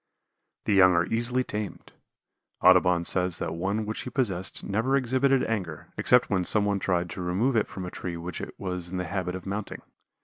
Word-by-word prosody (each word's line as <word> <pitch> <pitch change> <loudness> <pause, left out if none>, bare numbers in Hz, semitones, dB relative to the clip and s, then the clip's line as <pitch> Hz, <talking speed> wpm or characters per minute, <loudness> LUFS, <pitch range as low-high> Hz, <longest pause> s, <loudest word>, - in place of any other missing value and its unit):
The 105 - +1
young 95 -2 +6
are 85 0 +3
easily 120 +5 0
tamed. 105 -6 -6 0.7
Audubon 90 -1 +5
says 90 -1 +1
that - - -3
one 100 +6 -2
which 110 +1 -4
he - - -6
possessed 100 -9 -1
never 115 +7 0
exhibited 130 +1 +2
anger, 95 -9 -4
except 125 0 +4
when 95 -3 0
some 105 +3 +4
one 100 -1 0
tried 90 -2 0
to 90 - -6
remove 95 +9 0
it 110 - +2
from 90 +1 -7
a 90 - -6
tree 85 -2 -5
which 85 +2 -6
it - - -7
was 90 -2 -4
in 95 - -4
the 90 - -2
habit 90 -2 -3
of 95 - -8
mounting. 100 +1 -5
95 Hz, 200 wpm, -27 LUFS, 90-110 Hz, 0.7 s, young